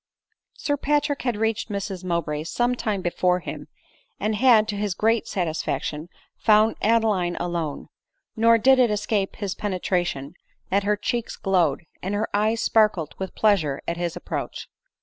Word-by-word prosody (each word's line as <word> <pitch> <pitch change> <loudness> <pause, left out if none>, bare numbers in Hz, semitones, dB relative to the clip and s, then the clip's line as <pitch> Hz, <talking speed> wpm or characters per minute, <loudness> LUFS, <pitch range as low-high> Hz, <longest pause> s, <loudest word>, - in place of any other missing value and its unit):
Sir 290 -1 -1
Patrick 290 0 0
had 245 -4 -1
reached 225 +1 -1
Mrs 200 -2 -4
Mowbray's 165 -3 -2
some 240 +1 +1
time 210 -6 -2
before 180 +1 +1
him, - - -7 0.5
and 215 - 0
had, 220 -1 +5
to 205 - -1
his 205 -2 -2
great 225 +2 +1
satisfaction, 160 -2 -2 0.3
found 215 0 +4
Ade 230 +1 +3
line 180 -5 0
alone; 170 -4 -3 0.5
nor 230 0 +5
did 260 +3 +5
it 245 -2 +5
escape 210 -1 -1
his 200 -3 -3
penetration 175 -7 -2 0.4
that 200 +1 +2
her 210 0 +2
cheeks 235 +2 -2
glowed, 175 -6 +1 0.2
and 195 +3 -2
her 215 +2 0
eyes 215 +2 +1
sparkled 210 -8 +2
with 190 -1 -5
pleasure 170 -10 +2
at 170 - -2
his 175 -1 -2
approach. - - -5
205 Hz, 155 wpm, -24 LUFS, 175-225 Hz, 0.5 s, had